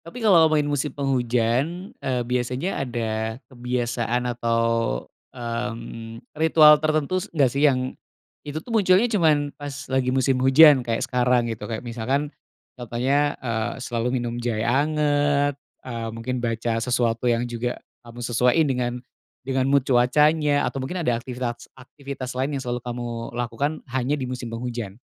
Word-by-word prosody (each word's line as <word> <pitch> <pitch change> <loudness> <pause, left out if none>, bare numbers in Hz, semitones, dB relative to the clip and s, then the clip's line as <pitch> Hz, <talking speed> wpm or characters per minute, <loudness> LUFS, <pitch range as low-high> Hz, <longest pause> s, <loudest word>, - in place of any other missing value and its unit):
tapi 225 +8 -9
kalau 170 -6 +6
ngomongin 150 -1 +1
musim 145 +1 -1
penghujan, 130 - 0
e - - -3
biasanya 125 +7 -2
ada 110 -2 -3 0.2
kebiasaan 120 -1 -2
atau, 115 -1 0 0.8
mmm, 115 -1 -5 0.2
ritual 155 -2 +7
tertentu 155 +4 0 0.2
nggak 135 -4 +4
sih, 145 +2 +4
yang 130 -1 -1 0.5
itu 145 +1 -8
tuh 240 - -8
munculnya 195 -1 +4
cuman 150 -6 +2
pas 145 -1 -7 0.2
lagi 130 -1 +1
musim 130 0 +1
hujan, 135 +2 +7
kayak 115 -2 -2
sekarang 125 -2 +1
gitu. 105 -2 -7
Kayak 115 +2 -5
misalkan 130 +6 -2 0.5
contohnya, 130 +5 0
eee, 115 -1 -1
selalu 120 +2 -1
minum 120 -1 -3
jahe 115 -2 -1
anget, 145 +1 +1 0.2
eee, 115 -3 -4
mungkin 115 +3 -4
baca 115 -1 -1
sesuatu 120 0 0
yang 120 0 +1
juga 120 0 -3 0.2
kamu 120 0 -9
sesuai 125 +3 +2 0.9
dengan 130 0 0
mood 140 -1 +3
cuacanya. 145 +4 +3
Atau 135 - -2
mungkin 175 +8 -4
ada 120 -3 +2
aktivitas-aktivitas 130 +2 -7
lain 135 +3 -2
yang 135 - -4
selalu 125 0 -2
kamu 120 0 -5 0.3
lakukan, 120 +5 -1 0.2
hanya 130 +3 0
di 135 - -4
musim 125 -1 -5
penghujan? 115 -3 -5
125 Hz, 140 wpm, -24 LUFS, 120-145 Hz, 0.9 s, ritual